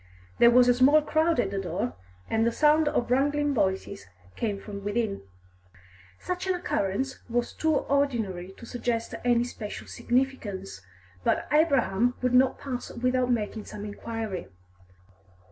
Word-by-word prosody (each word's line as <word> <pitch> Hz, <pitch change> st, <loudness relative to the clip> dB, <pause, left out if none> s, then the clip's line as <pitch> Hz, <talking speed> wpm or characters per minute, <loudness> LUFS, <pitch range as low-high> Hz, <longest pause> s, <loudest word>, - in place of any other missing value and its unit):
There 235 Hz, -, +8 dB
was 245 Hz, +1 st, +6 dB
a 245 Hz, -, +6 dB
small 280 Hz, +5 st, +5 dB
crowd 315 Hz, 0 st, +2 dB
at 195 Hz, -5 st, +1 dB
the 200 Hz, -, -2 dB
door, 170 Hz, -9 st, -3 dB, 0.3 s
and 225 Hz, 0 st, +1 dB
the 235 Hz, -, +2 dB
sound 300 Hz, +4 st, +4 dB
of 245 Hz, -5 st, 0 dB
wrangling 290 Hz, +2 st, +2 dB
voices 190 Hz, -, -1 dB, 0.3 s
came 205 Hz, -3 st, -2 dB
from 200 Hz, -1 st, -8 dB
within. 205 Hz, 0 st, -1 dB, 1.0 s
Such 360 Hz, +1 st, -4 dB
an 375 Hz, -, +2 dB
occurrence 265 Hz, -, -2 dB
was 240 Hz, 0 st, -1 dB
too 315 Hz, -1 st, +1 dB
ordinary 225 Hz, -12 st, 0 dB
to -, -, -11 dB
suggest 235 Hz, -1 st, -2 dB
any 240 Hz, -1 st, +3 dB
special 220 Hz, -3 st, -7 dB
significance, 225 Hz, -, -2 dB, 0.4 s
but -, -, +1 dB
Abraham 255 Hz, -7 st, +3 dB
would 250 Hz, 0 st, +1 dB
not 255 Hz, +1 st, +4 dB
pass 255 Hz, -3 st, -5 dB
without 250 Hz, +1 st, 0 dB
making 220 Hz, -2 st, -1 dB
some 210 Hz, 0 st, -7 dB
inquiry. 210 Hz, -2 st, -5 dB
240 Hz, 145 wpm, -27 LUFS, 205-270 Hz, 1.0 s, There